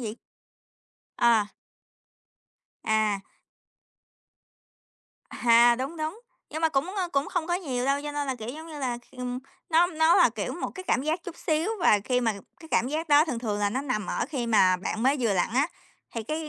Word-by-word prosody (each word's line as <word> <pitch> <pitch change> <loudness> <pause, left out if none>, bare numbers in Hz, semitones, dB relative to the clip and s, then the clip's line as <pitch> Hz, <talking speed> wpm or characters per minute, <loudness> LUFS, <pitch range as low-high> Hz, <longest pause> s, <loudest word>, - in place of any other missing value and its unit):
gì? 220 -2 -5 1.0
À. 230 -3 +4 1.4
À. 215 -2 +1 2.1
À, 235 0 +5
đúng, 270 +6 -4
đúng. 315 +8 -4 0.3
Nhưng 315 - -5
mà 325 - +4
cũng, 315 +6 -1
ơ, 370 -3 -1
cũng 280 +1 0
không 345 -3 -2
có 350 - 0
nhiều 265 -9 -2
đâu, 275 +1 +1
cho 295 0 -5
nên 290 -1 -2
là, 265 - -1
kiểu, 225 -2 -8
giống 315 +5 -7
như 310 -2 -8
là, 250 -3 -2
kh 240 - -25
ừm, 250 0 -4 0.3
nó 330 +2 +5
nó 320 -1 +3
là, - - +6
kiểu, - - -4
một - - -4
cái 375 - -7
cảm 260 -7 +1
giác 315 +4 -1
chút 350 - -8
xíu, 320 +5 0
và 210 - +5
khi 250 -1 +1
mà 225 -2 +1 0.3
cái 320 - -12
cảm 245 - +2
giác 320 +3 -3
đó 295 +1 +6
thường 255 -8 -3
thường 215 -3 -2
là 205 -1 +1
nó 260 - -1
nằm 250 -7 -2
ở - - -1
khi 265 -5 -3
mà 190 -5 +4
bạn 220 +4 -4
mới 270 +3 +3
vừa 225 -4 +2
lặn 180 - +1
á, 280 +5 +3 0.5
thì 230 - -3
cái 310 +6 -4
270 Hz, 205 wpm, -27 LUFS, 235-315 Hz, 2.1 s, là